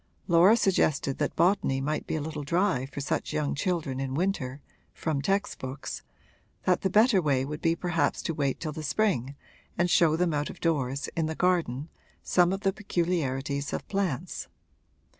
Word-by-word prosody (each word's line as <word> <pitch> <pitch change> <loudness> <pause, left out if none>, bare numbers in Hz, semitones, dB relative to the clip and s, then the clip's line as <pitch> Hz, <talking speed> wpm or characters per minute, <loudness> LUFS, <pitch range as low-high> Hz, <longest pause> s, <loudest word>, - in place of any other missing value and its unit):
Laura 180 +6 +6
suggested 155 - +1
that 145 - -1
botany 170 -6 +2
might 150 +3 -2
be - - -1
a 155 - -1
little 150 0 -4
dry 170 -4 +1
for 140 +1 -7
such 140 - -2
young 150 -2 0
children 155 -5 -1
in 135 -1 -3
winter, 145 -6 -1 0.4
from 155 -4 -1
text 195 +7 0
books 130 +2 -6 0.6
that 180 - +2
the 190 - +1
better 210 0 +5
way 135 -4 +1
would 150 +3 -6
be 165 0 +2
perhaps 170 -4 0
to 165 - -1
wait 140 -3 -1
till 155 - -3
the 155 +1 -6
spring 145 - 0 0.4
and 175 0 +2
show 160 -2 +5
them 170 -1 +1
out 145 0 -1
of - - -10
doors, 140 -4 0
in 160 -1 0
the 160 - -3
garden, 165 -7 +1 0.4
some 180 0 +3
of 195 +1 -2
the 195 -2 +1
peculiarities 145 -8 -1
of - - -4
plants. 190 -10 -2
155 Hz, 180 wpm, -28 LUFS, 140-180 Hz, 0.6 s, Laura